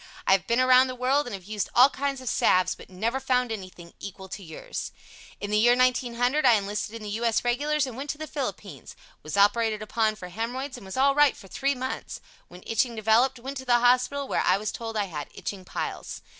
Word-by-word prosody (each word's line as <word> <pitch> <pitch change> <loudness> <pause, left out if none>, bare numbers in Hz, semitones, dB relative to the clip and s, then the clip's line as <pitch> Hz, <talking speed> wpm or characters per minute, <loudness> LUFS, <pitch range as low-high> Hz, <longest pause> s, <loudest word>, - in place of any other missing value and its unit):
I - - +3
have 195 -1 +3
been 235 +1 +2
around 255 0 +6
the 255 - -5
world 260 +3 +1
and 230 - -4
have 190 - -10
used 210 +1 -3
all 255 +3 +7
kinds 275 0 -3
of 255 - -10
salves, 185 -4 +3
but - - -14
never 225 +8 -2
found 250 -2 0
anything 185 -5 -8
equal 190 -1 -8
to 200 - -7
yours. 160 -4 -6 0.5
In 205 - -5
the 210 - +3
year 240 +2 +5
1900 250 +2 +2
I 250 -3 +7
enlisted 210 +2 -3
in 225 - -8
the 210 - -5
U. 225 +3 -3
S. 230 -1 +2
Regulars 290 +4 +1
and 255 -3 -7
went 275 +3 -6
to 295 - -3
the 310 - -5
Philippines. 295 -2 -6 0.3
Was 155 +5 -5
operated 215 +1 +3
upon 215 0 0
for 180 -4 -9
hemorrhoids 245 +8 -4
and 210 -6 -11
was 190 - -7
all 275 +1 +4
right 295 -1 +4
for 195 - -13
three 275 +8 -1
months. 260 +1 -5 0.3
When 180 +1 -14
itching 230 +2 0
developed, 225 +5 +3
went 270 +4 -6
to 260 - -7
the 240 -1 +4
hospital, 255 +3 +2
where - - 0
I - - +3
was 210 +1 -3
told 225 -1 -5
I 205 - +1
had 150 -6 -6
itching 195 -2 -6
piles. - - -5
235 Hz, 230 wpm, -26 LUFS, 205-260 Hz, 0.5 s, all